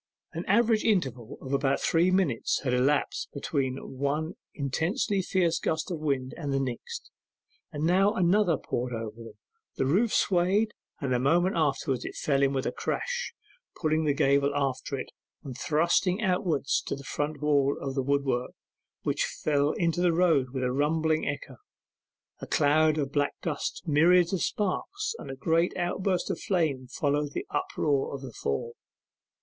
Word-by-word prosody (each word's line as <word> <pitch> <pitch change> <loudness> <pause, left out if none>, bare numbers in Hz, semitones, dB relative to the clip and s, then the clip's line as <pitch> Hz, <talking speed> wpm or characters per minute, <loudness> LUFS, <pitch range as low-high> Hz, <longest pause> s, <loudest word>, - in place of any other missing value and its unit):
An 170 - -4
average 220 +2 +3
interval 130 - 0
of 135 - -5
about 140 0 +2
three 170 +2 +3
minutes 185 -11 +1
had 125 -3 0
elapsed 135 +4 +1
between 135 -2 -1 0.2
one 150 +4 -1 0.2
intensely 160 +7 0
fierce 175 -2 +1
gust 160 +3 -2
of 170 - -3
wind 135 -4 -1
and 145 -4 -3
the 135 - +1
next, 130 -3 -5 0.6
and 150 +1 -2
now 190 +4 +4
another 180 -2 +3
poured 125 -1 -3
over 110 -1 -5
them; 115 -2 -11 0.4
the 135 - 0
roof 200 - +2
swayed, 195 +4 +2 0.3
and 135 -3 -1
a 125 - +2
moment 175 +8 +2
afterwards 140 -4 0 0.2
fell 140 -2 +1
in 135 -1 +3
with 135 0 -1
a - - 0
crash, 485 0 -3 0.4
pulling 155 -1 +1
the 145 -2 +2
gable 140 +1 +3
after 140 0 -1
it, - - -6 0.3
and 135 -4 -7
thrusting 170 - +1
outwards 180 -8 +1
the 140 - -4
front 145 +1 -3
wall 145 -1 +2
of 135 -1 -4
wood 140 +1 +1
work, 125 -2 -1 0.5
which - - 0
fell 145 -1 0
into 170 0 0
the 180 -1 +4
road 165 -7 +3
with 130 0 -3
a 125 - +1
rumbling 155 +3 +1
echo; - - -5 0.8
a - - -7
cloud 155 +1 +3
of 140 -2 -1
black 145 0 0
dust, 150 -4 -3
myriads 175 +4 +4
of 185 - 0
sparks, 405 - -1
and - - -8
a 135 - -5
great 165 +6 +1
outburst 180 +1 0
of - - -4
flame 155 -9 0
followed 145 +2 -1
the - - -3
uproar 140 -2 0
of 135 - -8
the 130 -3 -8
fall. 115 +12 -3
150 Hz, 165 wpm, -28 LUFS, 135-175 Hz, 0.8 s, now